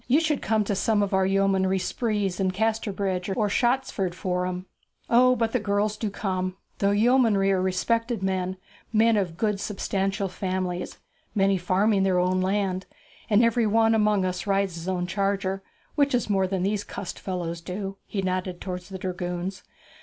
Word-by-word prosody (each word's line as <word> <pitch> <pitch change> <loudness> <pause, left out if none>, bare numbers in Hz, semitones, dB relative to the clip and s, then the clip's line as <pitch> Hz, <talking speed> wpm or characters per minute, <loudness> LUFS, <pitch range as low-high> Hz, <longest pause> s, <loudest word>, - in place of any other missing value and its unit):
You 265 +5 +5
should 310 -3 0
come 220 -1 +1
to 205 - -1
some 205 +1 +2
of 200 - -2
our 190 0 +3
yeomanry 195 -1 +2
sprees 205 -2 -1
in 190 -1 +2
Casterbridge 200 -2 -1
or 210 -3 +2
Shottsford 240 -6 0
Forum. 180 0 -2 0.5
O, 255 +2 +6
but 225 -1 0
the 250 - +1
girls 205 0 0
do 215 0 -2
come! 185 -2 -2 0.2
The 200 - +3
yeomanry 220 -4 +4
are 190 -1 +2
respected 230 +4 0
men, 185 -1 -1 0.3
men 225 +1 +4
of 180 -5 -1
good 210 -1 0
substantial 195 -1 -1
families, 185 -1 -3 0.4
many 195 -1 +3
farming 195 +3 +2
their 190 -1 +2
own 185 +1 +2
land; 190 -1 0 0.4
and 215 +2 +5
every 230 -1 +3
one 225 +1 +4
among 210 -3 +3
us 180 +1 -3
rides 195 -2 +1
his 165 +1 -7
own 180 -1 -1
charger, 195 0 -1 0.3
which 285 -3 +2
is 240 -3 0
more 190 -1 +2
than 185 -1 -1
these 205 +1 0
cussed 185 - -7
fellows 170 -3 -4
do.' 195 +2 -5
He 195 -2 -3
nodded 185 -1 -2
towards 180 -1 -6
the 190 - -6
dragoons. 180 0 -4
195 Hz, 170 wpm, -26 LUFS, 185-215 Hz, 0.5 s, O